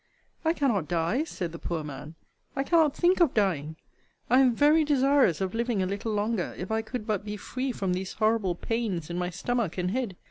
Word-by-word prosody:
I 320 0 +2
cannot 235 - 0
die, 175 - 0
said 180 - -5
the 165 - -8
poor 165 -3 -3
man 150 +2 -8 0.4
I 270 - 0
cannot 315 -2 +3
think 360 +3 +3
of 335 -7 +3
dying. 160 -8 0 0.6
I 255 - +6
am 255 -3 +4
very 300 +4 +5
desirous 275 - +3
of 190 -1 -1
living 230 -3 0
a - - 0
little 200 +4 -3
longer, 210 -2 -1
if 185 +4 -5
I 220 0 +1
could 225 0 -6
but 210 -4 -1
be 210 0 -5
free 255 +5 -3
from 195 -6 -1
these 185 +1 -3
horrible 215 -5 +1
pains 195 -6 -2
in 175 - -2
my 180 0 -1
stomach 225 0 -2
and 180 0 -1
head. 235 -5 -2
215 Hz, 210 wpm, -27 LUFS, 180-255 Hz, 0.6 s, I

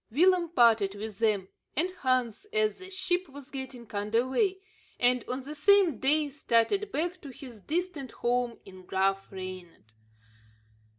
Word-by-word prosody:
Willem 345 +6 +3
parted 225 - +4
with 210 -1 -6
them 210 -4 +1 0.3
and 345 +6 +2
Hans 255 - 0
as 430 -2 +1
the 375 0 -10
ship 370 -2 -1
was 285 +1 -11
getting 260 -3 -6
"under 210 +4 0
way," 380 +8 +1 0.4
and, 250 0 +3
on 255 +2 -3
the 285 +3 -7
same 345 - +5
day, 295 +2 +2
started 295 - +1
back 350 +2 -2
to 285 - -9
his 250 -4 -11
distant 320 - -3
home 245 -1 0
in 185 -1 -12
Graaf 195 +1 0
Reinet. 185 - -8
260 Hz, 145 wpm, -29 LUFS, 220-345 Hz, 0.4 s, same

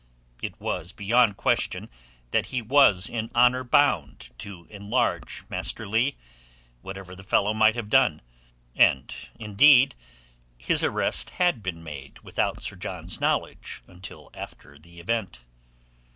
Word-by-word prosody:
It - - -6
was 85 +5 -4
beyond 105 0 +2
question - - 0 0.4
that - - +1
he 130 - -2
was 110 -6 +4
in 115 -1 -4
honour 125 +1 +4
bound 120 - +1
to 95 -4 -9
enlarge 105 +4 -2
Master 110 - -5
Leigh, 115 +7 +1 0.7
whatever 95 +1 -9
the 95 - -12
fellow 100 +2 +2
might 110 +1 +4
have 115 -3 -4
done; 120 - +3 0.5
and, 65 -2 +3 0.2
indeed, 125 +6 +5 0.6
his 60 0 0
arrest - - +1
had 175 -10 +2
been 90 -4 -5
made 70 -4 -9
without - - -2
Sir - - -3
John's - - -6
knowledge - - -2
until 90 0 -12
after 70 +2 -11
the 85 +2 -16
event. 95 - -3
105 Hz, 130 wpm, -25 LUFS, 90-120 Hz, 0.7 s, indeed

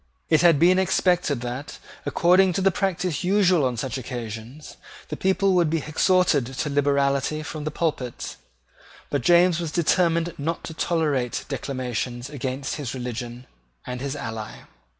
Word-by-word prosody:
It 155 -1 +5
had 170 -3 +6
been 180 +5 +5
expected 180 -7 +1
that, 125 +4 -5 0.3
according 180 +2 +4
to 195 - -1
the 195 +1 +4
practice 180 -3 -1
usual 185 -4 +3
on 125 -2 0
such 130 +2 -3
occasions, 120 +3 -7 0.3
the - - -3
people 190 0 +2
would 175 -3 +3
be 160 -2 -1
exhorted 160 -4 +2
to 150 - -1
liberality 140 +1 +1
from 150 0 -6
the - - 0
pulpits. 150 -6 -3 0.7
But 145 - 0
James 175 +4 +4
was 165 -3 -3
determined 170 0 +2
not 165 +4 -2
to 160 - -6
tolerate 150 -7 -1
declamations 125 -1 -4
against 135 -1 -4
his 135 -5 -4
religion 120 0 -6 0.4
and 125 0 -5
his 140 +1 -3
ally. 110 -5 -6
150 Hz, 150 wpm, -24 LUFS, 130-175 Hz, 0.7 s, had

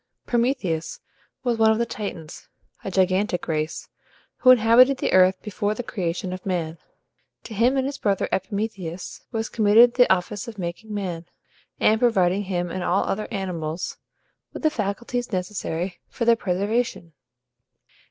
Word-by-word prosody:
Prometheus 235 - -1 0.4
was 240 -3 0
one 220 0 +6
of 220 - +3
the 235 - +1
Titans, 185 -8 -7 0.3
a - - -3
gigantic 190 0 +1
race, 155 -1 -2 0.5
who 255 - +4
inhabited 250 +2 +6
the - - -1
earth 185 0 +5
before 210 0 -2
the 245 - -4
creation 180 -4 -3
of 185 - -7
man. 170 -4 -3 0.6
To 225 - -9
him 240 +6 +2
and 265 - +1
his 280 0 -4
brother 200 -2 0
Epimetheus 190 -3 -4
was 225 -2 -2
committed 225 +2 +5
the 245 -1 +4
office 190 +3 0
of 225 -2 -8
making 180 +4 -6
man, 180 -5 -4 0.5
and 220 +1 +4
providing 200 -5 +2
him 175 -2 -2
and 185 0 -3
all 185 +2 +2
other 215 +2 -2
animals 180 -6 -4 0.5
with - - -8
the 310 - +3
faculties 235 +1 -3
necessary 180 -2 -3
for 235 - -3
their 235 0 +6
preservation. 200 -2 -2
200 Hz, 150 wpm, -24 LUFS, 180-230 Hz, 0.6 s, one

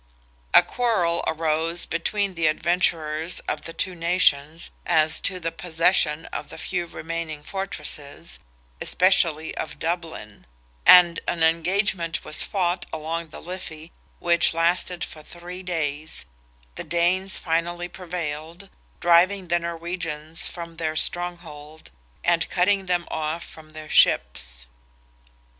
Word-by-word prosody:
A - - +8
quarrel 180 -6 0
arose 160 +1 +1
between 195 +4 -1
the 165 -2 +1
adventurers 160 0 +1
of - - -4
the - - -5
two 185 +3 -1
nations 165 -2 +2
as 160 -2 +3
to 185 -2 0
the 165 -1 -3
possession 165 -2 +1
of - - -5
the - - -9
few 175 -2 -2
remaining 160 -2 -5
fortresses, 150 - -4 0.4
especially 170 -4 +2
of 150 -1 -5
Dublin; 160 - -5 0.4
and 175 -2 +8
an 165 -2 0
engagement 170 +1 +1
was 150 - 0
fought 180 -2 -1
along 160 +2 -4
the - - -10
Liffey, 170 -2 -8 0.3
which 170 -1 +3
"lasted 175 +1 +1
for 155 -2 -8
three 175 +3 -9
days;" 155 - -3 0.5
the - - -6
Danes 180 +3 +1
finally 175 +1 -2
prevailed, 175 0 -6 0.3
driving 175 +2 +4
the 175 +1 +2
Norwegians 165 -2 -2
from 170 -1 -9
their 155 -1 -2
stronghold, 160 -3 -2 0.3
and 170 -1 +2
cutting 190 +1 +1
them 175 -1 0
off 160 +2 -3
from 155 -1 -12
their 155 0 -10
ships. - - +2
170 Hz, 120 wpm, -24 LUFS, 155-180 Hz, 0.5 s, A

